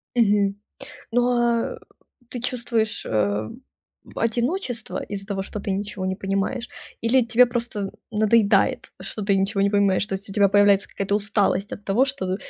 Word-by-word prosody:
Мгм. 205 -4 +3 0.6
Но 245 +1 +2 0.5
а - - -12 0.5
ты 245 - -5
чувствуешь, 235 -3 -1
э, 105 0 0 0.7
одиночество 240 - -2
из-за 195 -1 -6
того, 195 -2 -2
что 205 +2 -6
ты 200 - -4
ничего 195 -1 -3
не 190 0 -2
понимаешь? 195 +5 -2 0.3
Или 245 +3 +3
тебе 245 +1 +5
просто 235 -5 -3 0.2
надоедает, 215 0 +3 0.2
что 215 - -5
ты 200 -1 +2
ничего 195 +1 0
не 200 0 +3
понимаешь? 200 -1 +2
То 195 - -3
есть 195 +1 -6
у - - -6
тебя 200 -1 +4
появляется 205 0 +4
какая-то 200 0 -2
усталость 205 -1 0
от 205 - -7
того, 205 +7 +3
что 260 -9 -3
205 Hz, 160 wpm, -23 LUFS, 195-230 Hz, 0.7 s, тебе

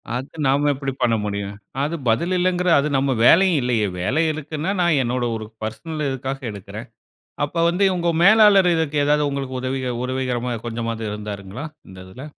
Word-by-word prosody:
அது 130 +3 -4 0.2
நாம 140 +2 +2
எப்படி 135 0 -4
பண்ண 115 -1 +3
முடியும்? 100 0 -4 0.3
அது 155 +4 -2
பதில் 170 +11 +1
இல்லங்கிற 180 0 +1
அது 140 - 0
நம்ம 135 0 +1
வேலையும் 180 +2 +5
இல்லையே. 115 -4 +1
வேலை 130 - +1
இருக்குனா, 155 +3 -4
நான் 170 -5 +3
என்னோட 120 0 -1
ஒரு 110 - -5 0.2
பெர்சனல் 150 +8 -4
இதுக்காக 135 +1 -4
எடுக்குறேன். 100 -2 -9 0.6
அப்போ 165 +3 -5
வந்து 180 +4 0
உங்க 170 -1 0
மேலாளர் 200 -2 +6
இதுக்கு 160 -2 -1
ஏதாது 150 +1 +3
உங்களுக்கு 135 -2 -4
உதவிக 130 -1 -2
உரவிகரமா 125 -1 -2 0.2
கொஞ்சமாது 115 -1 -4
இருந்தாருங்களா? 105 +4 -6 0.2
இந்த 95 - -12
இதுல? 95 +9 -11
135 Hz, 160 wpm, -21 LUFS, 115-160 Hz, 0.6 s, மேலாளர்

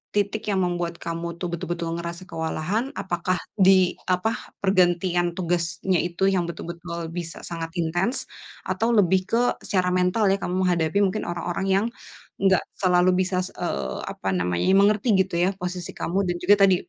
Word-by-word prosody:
titik 205 +1 0
yang 190 -2 +2
membuat 175 -1 -2
kamu 170 0 -4
tuh 180 - -4
betul-betul 170 -1 -3
ngerasa 170 +2 -6
kewalahan 170 +8 -2
apakah 185 0 -1 0.2
di 190 -1 +6 0.2
apa 185 +5 +2 0.3
pergantian 175 -2 +2
tugasnya 170 0 0
itu 175 +2 -1
yang 180 -2 +2
betul-betul 170 0 -6
bisa 165 -1 -6
sangat 165 -1 -5
intens, 175 - 0 0.4
atau 225 +1 0
lebih 190 -1 +4
ke 230 - +2 0.2
secara 185 -3 0
mental 185 +4 +2
ya 195 - +2
kamu 180 - -2
menghadapi 175 +1 +1
mungkin 190 +3 -1
orang-orang 175 +2 -3
yang, 200 +3 +2 0.6
enggak 190 -2 +4 0.2
selalu 180 -1 +4
bisa, 185 0 -1 0.2
eee, 65 -1 -2
apa 95 - -4
namanya 90 -1 0 0.2
mengerti 210 +3 +3
gitu 185 -1 -3
ya 185 - +3
posisi 180 -1 -4
kamu 180 +3 -1
dan 175 - 0
juga 200 +3 +6
tadi, 190 -1 +5
180 Hz, 155 wpm, -24 LUFS, 170-190 Hz, 0.6 s, di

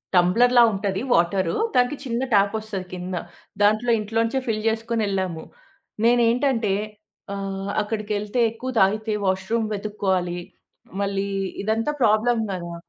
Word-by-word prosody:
టంబ్లర్‌లా 240 +8 +5
ఉంటది. 195 0 -2
వాటర్ 170 +1 +2 0.2
దానికి 250 +3 +3
చిన్న 235 0 -2
ట్యాపొస్తది 200 -1 +1
కింద. 180 +1 -4 0.5
దాంట్లో 215 +4 +3
ఇంట్లో 215 +2 -4
నుంచే 265 +4 -1
ఫిల్ 215 -2 -1
చేసుకొని 225 0 -1
వెళ్ళాము. 185 -4 -2 0.6
నేను 240 +1 +5
ఏంటంటే. 235 -5 +1 0.6
ఆహ్. 195 0 -4
అక్కడికి 210 0 -4
వెళ్తే 210 +4 -3
ఎక్కువ 235 +3 -6
తాగితే 215 +3 +2
వాష్‌రూమ్ 190 +4 0
వెతుక్కోవాలి. 190 -4 -1 0.6
మళ్ళీ 200 0 -1 0.4
ఇదంతా 225 +6 0
ప్రాబ్లమ్ 225 +1 +3
గదా! 170 -2 -5
210 Hz, 120 wpm, -23 LUFS, 195-230 Hz, 0.6 s, టంబ్లర్‌లా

